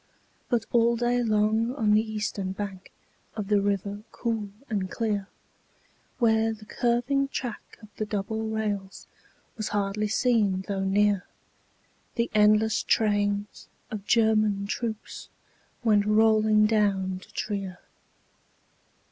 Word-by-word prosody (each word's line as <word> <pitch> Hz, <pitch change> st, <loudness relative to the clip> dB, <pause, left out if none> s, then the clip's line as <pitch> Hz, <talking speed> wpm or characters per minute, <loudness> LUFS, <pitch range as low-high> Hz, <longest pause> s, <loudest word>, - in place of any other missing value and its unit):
But 235 Hz, -3 st, +1 dB
all 235 Hz, 0 st, +4 dB
day 240 Hz, +1 st, +1 dB
long 220 Hz, +2 st, +1 dB
on 220 Hz, -6 st, +1 dB
the 215 Hz, -, +5 dB
eastern 210 Hz, -3 st, -3 dB
bank 195 Hz, -1 st, -6 dB, 0.4 s
Of 210 Hz, -2 st, -4 dB
the 205 Hz, -1 st, +4 dB
river 200 Hz, 0 st, -1 dB
cool 225 Hz, -4 st, -2 dB, 0.2 s
and 195 Hz, -4 st, -2 dB
clear, 210 Hz, -3 st, -2 dB, 0.9 s
Where 225 Hz, -2 st, +3 dB
the 215 Hz, -1 st, -12 dB
curving 245 Hz, +5 st, +1 dB
track 245 Hz, -4 st, -6 dB
of 215 Hz, -, -12 dB
the 215 Hz, -, -1 dB
double 210 Hz, +1 st, -2 dB
rails 205 Hz, -3 st, -3 dB, 0.5 s
Was 215 Hz, -, -2 dB
hardly 205 Hz, +1 st, -1 dB
seen 210 Hz, -5 st, +1 dB
though 195 Hz, -1 st, -2 dB
near, 200 Hz, 0 st, +2 dB, 0.9 s
The 235 Hz, -1 st, 0 dB
endless 215 Hz, +1 st, +4 dB
trains 205 Hz, -1 st, 0 dB, 0.2 s
of 205 Hz, -2 st, -6 dB
German 215 Hz, -3 st, +3 dB
troops 220 Hz, +1 st, -5 dB, 0.5 s
Went 210 Hz, -3 st, +3 dB
rolling 215 Hz, 0 st, +4 dB
down 195 Hz, -4 st, +1 dB
to -, -, -17 dB
Trier. 195 Hz, -4 st, -4 dB
215 Hz, 120 wpm, -27 LUFS, 200-225 Hz, 0.9 s, the